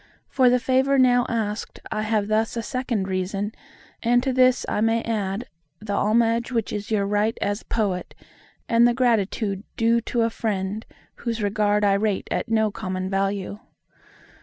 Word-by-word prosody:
For 255 -2 +4
the 250 - +4
favour 265 +2 +2
now 245 -1 +4
asked 220 -3 -3
I 215 - -1
have 215 -1 0
thus 220 +2 0
a 230 - -2
second 245 -6 -2
reason: 195 +3 -2 0.5
and 245 +1 +3
to 265 -1 0
this 255 0 +4
I - - -1
may 225 +1 +2
add, 210 0 -2 0.3
the 205 -1 -5
homage 230 +3 +2
which 230 -4 -1
is 205 0 -4
your 210 -3 +1
right 210 +2 0
as 205 +1 -1
Poet, 200 -5 -2 0.5
and 235 +1 +5
the 240 - +1
gratitude 215 -5 +1 0.2
due 230 +1 +3
to 235 +1 -1
a 230 - +1
Friend, 210 -1 -2 0.3
whose 230 -2 -3
regard 205 0 +2
I 200 - +4
rate 200 0 0
at - - -2
no 220 -1 +2
common 185 -1 -4
value. 195 +1 -1
220 Hz, 165 wpm, -24 LUFS, 200-235 Hz, 0.5 s, and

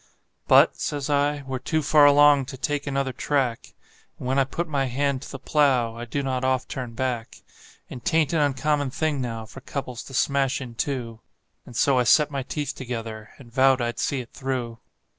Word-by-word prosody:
"But," - - +6
says 145 -1 -3
I, 145 0 +1
"we're 130 -1 -4
too 155 +4 -1
far 150 0 +6
along 145 -1 +6
to 130 - -7
take 145 +2 -2
another 135 -1 -1
track, 130 -3 -1 0.4
And - - -6
when 135 +2 +2
I 135 - +3
put 170 +6 -3
my 140 -3 0
hand 135 +1 -1
to - - -9
the 135 - -6
plow 130 -5 +2
I 120 +1 -6
do 140 +4 -3
not 130 -1 -2
oft 130 0 0
turn 125 -3 -5
back; 120 -2 -3 0.4
And 125 - -9
'tain't 160 -1 +2
an 165 - +2
uncommon 145 0 +1
thing 150 0 -1
now 115 -3 -4
for 135 +5 -12
couples 125 -3 -5
to 135 - -9
smash 135 0 +1
in 125 -3 -8
two;" 115 -3 -3 0.5
And 120 - -11
so 130 +2 +3
I - - +3
set 150 +3 +4
my 140 -1 -2
teeth 145 +3 -4
together, 115 -4 -6
and 120 -4 -15
vowed 135 0 +4
I'd 120 -1 -2
see 135 -2 -1
it 120 - -14
through. 125 -4 -4
135 Hz, 200 wpm, -24 LUFS, 125-145 Hz, 0.5 s, But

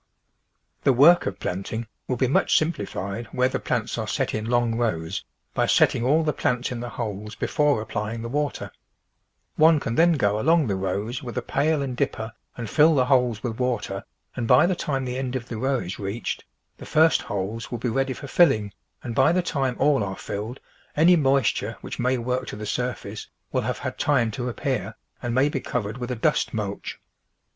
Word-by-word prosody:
The 135 - +4
work 160 +8 +6
of 100 -1 -4
planting 100 +5 -3 0.2
will 130 - 0
be 130 - +1
much 130 - +3
simplified 115 - -2
where 125 0 +1
the - - -2
plants - - -2
are - - -3
set - - -1
in 110 +1 -3
long 120 -1 +2
rows 100 -7 -1 0.3
by - - +1
setting - - +3
all 150 +6 +3
the 150 -1 +1
plants 125 -2 -1
in 125 - -4
the 120 0 -5
holes 105 -3 -5
before 150 -5 +1
applying 110 +1 -4
the - - -3
water; 145 +2 -2 0.9
one 160 0 +6
can 115 - -3
then 170 +6 +5
go 105 -8 +1
along 160 +5 +4
the 100 -5 0
rows 100 +6 -2
with 125 -1 -7
a 125 - -1
pail 145 +2 +1
and 130 -2 -3
dipper 115 -4 -2 0.2
and 115 -2 -4
fill 155 +7 +5
the 130 -2 +3
holes 125 -5 +2
with 115 -1 -3
water, 110 -6 -1 0.3
and 120 -3 -2
by 125 +7 +6
the 185 - +2
time 135 -5 -2
the 125 +1 -3
end 130 -1 -3
of 125 -2 -4
the 115 - -4
row 135 +2 +1
is 90 -5 -5
reached, 100 +3 -4 0.3
the - - -9
first 160 +1 +4
TRANSPLANTING 105 - -4
holes 115 +1 -7
will 120 - -2
be 120 +2 -2
ready 135 +3 0
for 140 - -9
filling, 120 - +3 0.3
and 120 - -4
by 135 +5 +4
the 180 +1 +1
time 135 -7 -1
all 145 -6 +3
are 95 -1 -4
filled, 110 +5 -5 0.4
any 170 +4 +6
moisture 135 -7 +1
which - - -7
may 125 +1 +2
work 125 +2 -2
to - - -5
the 105 +1 -6
surface 110 -2 -3 0.3
Mall - - +2
have - - -2
had - - -5
time 125 -6 +2
to 125 +3 -3
apj)ear 115 -6 -2 0.3
and 120 -1 -2
may 130 +2 +4
be 145 -2 -2
covered 115 -2 -3
with 125 0 -4
a 125 - -1
dust 115 - +1
mulch. 100 -2 -4
125 Hz, 205 wpm, -24 LUFS, 110-135 Hz, 0.9 s, work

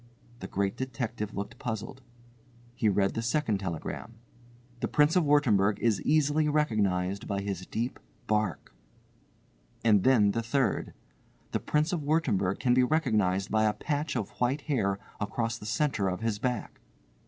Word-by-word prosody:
The - - -6
Great 100 0 -1
Detective 120 -5 -4
looked 100 +1 -5
puzzled. 115 +3 -5 0.7
He 110 -3 +1
read 100 -1 +2
the 115 - -2
second 115 -3 0
telegram. 95 +5 -5 0.6
"The - - -1
Prince 150 +3 +3
of 180 - +4
Wurttemberg 110 -9 +3
is 110 -5 +1
easily 150 0 +2
recognised 100 -10 0
by 100 -1 -1
his 95 -2 -4
deep 120 +3 -3 0.3
bark." 105 - -1 1.1
And 105 -4 +5
then 110 -6 +5
the 115 - -1
third. 125 +2 0 0.6
"The - - 0
Prince 155 +3 0
of 170 - -1
Wurttemberg 125 - +1
can 125 -2 +3
be 130 - +5
recognised 110 - +1
by 110 0 +3
a 105 - +2
patch 145 +2 -2
of 110 -5 -2
white 130 +4 +1
hair 110 -10 0 0.2
across 115 +2 -2
the 105 - -8
centre 115 -5 0
of 90 +2 -4
his 115 -2 -1
back." 125 -2 -3
115 Hz, 155 wpm, -29 LUFS, 100-140 Hz, 1.1 s, And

